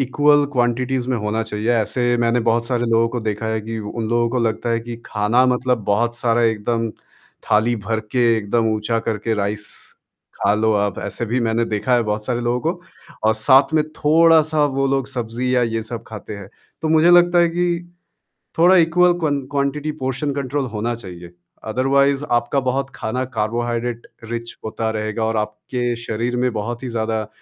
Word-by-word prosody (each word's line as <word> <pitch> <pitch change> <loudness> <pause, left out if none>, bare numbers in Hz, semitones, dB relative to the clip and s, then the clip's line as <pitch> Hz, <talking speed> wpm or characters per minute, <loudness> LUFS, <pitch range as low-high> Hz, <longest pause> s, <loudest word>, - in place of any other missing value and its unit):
Equal 145 +2 +3
quantities 125 0 0
में 125 - +1
होना 105 +1 -1
चाहिए। 110 +1 -2
ऐसे 120 +2 +1
मैंने 120 +1 +2
बहुत 115 +1 +2
सारे 120 -1 0
लोगों 115 0 +3
को 120 +1 -4
देखा 110 0 -3
है 110 0 -1
कि 110 +1 -5
उन 110 +1 -4
लोगों 120 0 +2
को 125 - 0
लगता 115 +1 -1
है 115 0 +1
कि 120 0 -7
खाना 105 +5 +2
मतलब 125 -1 0
बहुत 115 +4 +1
सारा 120 0 +1
एकदम 115 +1 0 0.6
थाली 110 +3 +3
भर 110 0 0
के 125 -2 +3
एकदम 110 +2 0
ऊँचा 110 +2 -1
करके 110 +1 -1
राइस 105 0 -2 0.7
खा 100 - +2
लो 110 +1 +2
आप 100 -2 0
ऐसे 120 - -4
भी 120 +4 0
मैंने 115 0 +1
देखा 115 +3 0
है 120 - +3
बहुत 105 -1 -2
सारे 120 0 -1
लोगों 120 +1 0
को 175 - -19 0.5
और 110 - +3
साथ 135 +6 +4
में 155 - +4
थोड़ा-सा 155 0 +4
वो 135 -1 0
लोग 135 -1 0
सब्ज़ी 125 -1 -2
या 125 - +3
ये 115 -1 -1
सब 115 +1 -7
खाते 105 -1 -8
हैं। 100 -2 -10 0.3
तो 160 - 0
मुझे 160 +2 +5
लगता 175 0 +6
है 170 0 +5
कि 175 +1 0 0.9
थोड़ा 175 +3 +6
इक्वल 175 +1 +4
क्वं 145 -4 0
क्वांटिटी 145 +2 -1
पोर्शन 135 +3 -1
कंट्रोल 140 0 -2
होना 115 +2 -2
चाहिए। 90 -6 -10 0.4
अदरवाइज़ 140 +4 +2 0.2
आपका 120 +4 -1
बहुत 135 +1 -1
खाना 125 +4 -2
कार्बोहाइड्रेट 120 +2 -2 0.2
रिच 115 +1 -6
होता 110 0 -2
रहेगा 110 +1 -3
और 110 0 -1
आपके 120 +3 -2
शरीर 115 +2 -2
में 125 0 +1
बहुत 115 +3 -4
ही - - -3
ज़्यादा 110 -2 -2
120 Hz, 185 wpm, -20 LUFS, 110-130 Hz, 0.9 s, लगता